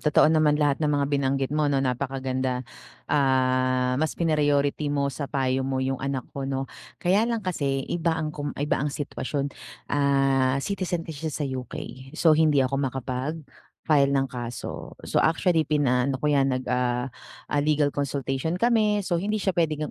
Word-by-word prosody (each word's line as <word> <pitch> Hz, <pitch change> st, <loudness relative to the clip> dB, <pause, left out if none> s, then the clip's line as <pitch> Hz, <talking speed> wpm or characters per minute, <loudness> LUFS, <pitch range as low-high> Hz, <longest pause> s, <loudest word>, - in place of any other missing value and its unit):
totoo 150 Hz, 0 st, +4 dB
naman 155 Hz, -2 st, +4 dB
lahat 145 Hz, -2 st, +2 dB
ng 155 Hz, -, +1 dB
mga 140 Hz, -1 st, +1 dB
binanggit 135 Hz, -1 st, 0 dB
mo 150 Hz, 0 st, +1 dB
'no, 135 Hz, -1 st, +1 dB
napakaganda, 130 Hz, 0 st, -1 dB, 0.5 s
ah, 130 Hz, -2 st, +2 dB
mas 155 Hz, 0 st, 0 dB
pina-priority 145 Hz, -2 st, +1 dB
mo 140 Hz, -1 st, 0 dB
sa 140 Hz, +2 st, -5 dB
payo 130 Hz, -1 st, 0 dB
mo 130 Hz, -1 st, -1 dB
'yung 130 Hz, 0 st, -1 dB
anak 135 Hz, -2 st, -2 dB
ko 135 Hz, -1 st, -5 dB
'no. 135 Hz, -1 st, -3 dB, 0.3 s
Kaya 195 Hz, +5 st, +3 dB
lang 230 Hz, -2 st, -1 dB
kasi 140 Hz, -7 st, -1 dB
iba 165 Hz, -1 st, +1 dB
ang 155 Hz, -1 st, -2 dB
kom 145 Hz, -2 st, -5 dB
iba 145 Hz, +2 st, 0 dB
ang 145 Hz, -, 0 dB
sitwasyon, 140 Hz, -1 st, -3 dB, 0.4 s
ah, 135 Hz, -2 st, +2 dB
citizen 180 Hz, -4 st, -2 dB
kasi 160 Hz, -1 st, -6 dB
siya 155 Hz, -, -2 dB
sa -, -, +1 dB
UK, 130 Hz, -2 st, -5 dB, 0.4 s
so, 160 Hz, -1 st, +4 dB
hindi 150 Hz, -4 st, +4 dB
ako 135 Hz, +1 st, 0 dB
makapag-file 140 Hz, +2 st, -1 dB
ng 135 Hz, 0 st, +2 dB
kaso. 120 Hz, -1 st, -6 dB
So -, -, 0 dB
actually 165 Hz, 0 st, +2 dB
pinaano 135 Hz, -3 st, +2 dB
ko -, -, +1 dB
'yan, 140 Hz, -2 st, +3 dB
nag 130 Hz, -, -5 dB
ah, 125 Hz, 0 st, 0 dB, 0.4 s
ah, 145 Hz, -, +3 dB
legal 150 Hz, -1 st, +2 dB
consultation 140 Hz, +2 st, -2 dB
kami 215 Hz, -2 st, +2 dB
so 175 Hz, -2 st, 0 dB
hindi 210 Hz, +2 st, -1 dB
siya 195 Hz, -, +2 dB
pwedeng 155 Hz, -2 st, 0 dB
140 Hz, 170 wpm, -25 LUFS, 130-155 Hz, 0.5 s, totoo